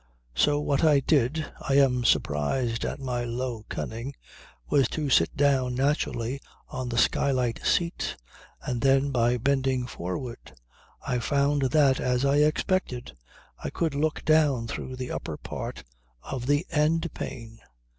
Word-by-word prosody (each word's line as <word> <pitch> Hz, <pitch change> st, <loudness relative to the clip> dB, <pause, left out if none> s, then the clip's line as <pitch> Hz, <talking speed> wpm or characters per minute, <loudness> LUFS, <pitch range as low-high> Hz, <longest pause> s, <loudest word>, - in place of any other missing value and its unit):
So 145 Hz, -, +3 dB
what 145 Hz, 0 st, 0 dB
I 150 Hz, -3 st, +6 dB
did 145 Hz, +2 st, +1 dB, 0.2 s
I 135 Hz, -, 0 dB
am 130 Hz, -3 st, +4 dB
surprised 115 Hz, -, +1 dB
at -, -, -4 dB
my 125 Hz, -3 st, -2 dB
low 120 Hz, -2 st, -4 dB
cunning 115 Hz, +5 st, -5 dB, 0.5 s
was 135 Hz, -4 st, +3 dB
to 150 Hz, -1 st, -3 dB
sit 80 Hz, -8 st, +3 dB
down 135 Hz, -3 st, +2 dB
naturally 135 Hz, -2 st, -1 dB, 0.3 s
on 130 Hz, -1 st, -4 dB
the 120 Hz, -, -3 dB
skylight 125 Hz, -2 st, +1 dB
seat 170 Hz, -1 st, 0 dB, 0.5 s
and 120 Hz, -2 st, -2 dB
then 135 Hz, +1 st, +3 dB
by 120 Hz, -1 st, +2 dB
bending 135 Hz, 0 st, +1 dB
forward 115 Hz, -, -6 dB, 0.5 s
I 125 Hz, -, 0 dB
found 140 Hz, +1 st, +1 dB
that, 135 Hz, -1 st, +4 dB
as 125 Hz, +1 st, +1 dB
I 140 Hz, +1 st, +3 dB
expected, 150 Hz, -, 0 dB, 0.5 s
I -, -, -2 dB
could 165 Hz, -3 st, -1 dB
look 150 Hz, +2 st, -1 dB
down 150 Hz, -6 st, +3 dB
through 130 Hz, +2 st, -5 dB
the 125 Hz, -1 st, -5 dB
upper -, -, -4 dB
part -, -, -6 dB, 0.4 s
of 130 Hz, -2 st, -5 dB
the 145 Hz, +4 st, +2 dB
end 160 Hz, +2 st, +1 dB
pane. 115 Hz, -2 st, -7 dB
135 Hz, 145 wpm, -27 LUFS, 120-145 Hz, 0.5 s, I